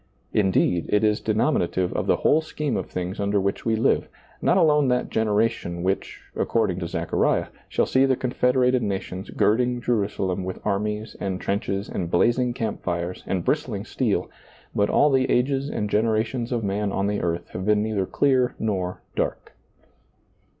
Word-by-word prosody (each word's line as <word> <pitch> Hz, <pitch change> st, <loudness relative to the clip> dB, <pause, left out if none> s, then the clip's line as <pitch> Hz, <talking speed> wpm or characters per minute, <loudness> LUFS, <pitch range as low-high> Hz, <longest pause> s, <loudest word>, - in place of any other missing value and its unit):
Indeed, 95 Hz, -4 st, +2 dB
it 105 Hz, +1 st, +2 dB
is 105 Hz, 0 st, +3 dB
denominative 105 Hz, -, +1 dB
of -, -, -2 dB
the -, -, +4 dB
whole 155 Hz, -, +3 dB
scheme 150 Hz, -3 st, -3 dB
of -, -, -3 dB
things 90 Hz, +3 st, -4 dB
under 100 Hz, 0 st, +1 dB
which 100 Hz, +3 st, -2 dB
we 115 Hz, -, +3 dB
live, 110 Hz, -, +2 dB, 0.3 s
not -, -, +3 dB
alone 150 Hz, -5 st, +4 dB
that 125 Hz, 0 st, 0 dB
generation 105 Hz, -5 st, 0 dB
which, 95 Hz, +1 st, -2 dB
according 105 Hz, -6 st, 0 dB
to 85 Hz, -, -3 dB
Zechariah, -, -, 0 dB, 0.2 s
shall -, -, +1 dB
see 130 Hz, +1 st, +3 dB
the 130 Hz, -, +3 dB
confederated 125 Hz, 0 st, +2 dB
nations 95 Hz, -2 st, -4 dB
gird 110 Hz, +3 st, +2 dB
ling 125 Hz, 0 st, 0 dB
Jerusalem 100 Hz, -5 st, -1 dB
with 95 Hz, 0 st, -5 dB
armies 105 Hz, +2 st, -2 dB
and 95 Hz, -2 st, -2 dB
trenches 100 Hz, 0 st, -2 dB
and 85 Hz, -3 st, -3 dB
blazing 120 Hz, +8 st, +2 dB
camp 110 Hz, -4 st, -3 dB
fires 85 Hz, 0 st, -3 dB
and 90 Hz, -3 st, -1 dB
bristling -, -, -1 dB
steel, -, -, 0 dB, 0.5 s
but 100 Hz, 0 st, +1 dB
all 145 Hz, -, +4 dB
the 130 Hz, -1 st, +2 dB
ages 135 Hz, +2 st, +1 dB
and 105 Hz, -, -2 dB
generations 110 Hz, +3 st, 0 dB
of 120 Hz, -2 st, -1 dB
man 100 Hz, 0 st, -1 dB
on 95 Hz, -, 0 dB
the 105 Hz, 0 st, -1 dB
earth 85 Hz, 0 st, -2 dB
have 95 Hz, -, -5 dB
been 105 Hz, +1 st, +2 dB
neither 105 Hz, -4 st, -1 dB
clear 130 Hz, -3 st, +2 dB
nor 95 Hz, -5 st, -2 dB
dark. -, -, -3 dB
105 Hz, 170 wpm, -24 LUFS, 95-125 Hz, 0.5 s, the